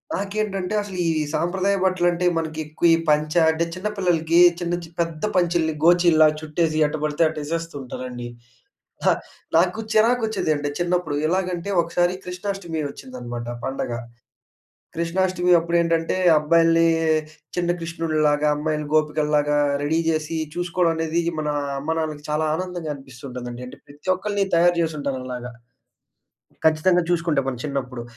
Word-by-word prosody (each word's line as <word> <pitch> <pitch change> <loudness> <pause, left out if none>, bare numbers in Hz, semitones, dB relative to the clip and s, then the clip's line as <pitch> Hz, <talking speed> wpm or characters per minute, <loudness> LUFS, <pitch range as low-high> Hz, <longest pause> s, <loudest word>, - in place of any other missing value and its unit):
నాకేంటంటే 200 -1 -2
అసలు 200 -3 -7
ఈ 165 - +3 0.2
సాంప్రదాయ 190 +4 +1
బట్టలంటే 180 -1 +1
మనకి 160 -1 -3
ఎక్కువ 155 +3 0
ఈ - - 0
పంచ 150 0 +2 0.2
అంటే 165 +1 0
చిన్న 185 +3 -3
పిల్లలకి 170 -3 +2 0.2
చిన్న 175 0 -1
చి - - -9
పెద్ద 165 0 -4
పంచల్ని 170 -3 +2
గోచీల్లా 170 -2 +6
చుట్టేసి 155 0 -1
ఎట్ట 150 +1 -1
పడితే 150 +2 -1
అట్ట 155 0 -5
యేసేస్తూ 165 +1 -4
ఉంటారండి. 125 -1 -6 0.8
అ! - - +5 0.4
నాకు 180 +5 +3 0.2
చిరాకొచ్చేది. 220 -4 +2
అంటే 145 0 -2
చిన్నప్పుడు 175 -4 0
ఎలాగంటే, 180 +1 -1
ఒకసారి 175 +2 0
కృష్ణాష్టమి 180 -3 -4
వచ్చిందనమాట 120 -3 -7 0.2
పండగ. 135 -2 -3 1.0
కృష్ణాష్టమి 180 +1 0
అప్పుడేంటంటే 170 0 +1 0.2
అబ్బాయిలనీ 165 +1 +4 0.7
చిన్న 175 0 +1
కృష్ణుళ్ళులాగా, 155 -3 0
అమ్మాయిలని 150 0 -2
గోపికల్లాగా, 150 -1 +2 0.2
రెడీ 160 +3 +1
జేసీ 155 0 -1 0.2
చూసుకోవడం 175 -1 +1
అనేది 160 +1 0 0.2
మన 150 -1 -2 0.3
అమ్మానాన్నలకి 155 0 -3
చాలా 155 +1 0
ఆనందంగా 180 -3 -4
అనిపిస్తుంటుందండి. 125 -2 -8
అంటే - - -11
ప్రతి 145 +6 -9
ఒక్కళ్ళని 200 +1 -1
తయారు 175 +1 +4
జేసి 160 -2 0
ఉంటారలాగా. 130 -3 -4 1.1
ఖచ్చితంగా 170 +3 +4
చూసుకుంటే 165 -4 +1
మనం 125 -3 -3
చిన్నప్పుడు. 130 -4 -4
165 Hz, 125 wpm, -23 LUFS, 150-175 Hz, 1.1 s, గోచీల్లా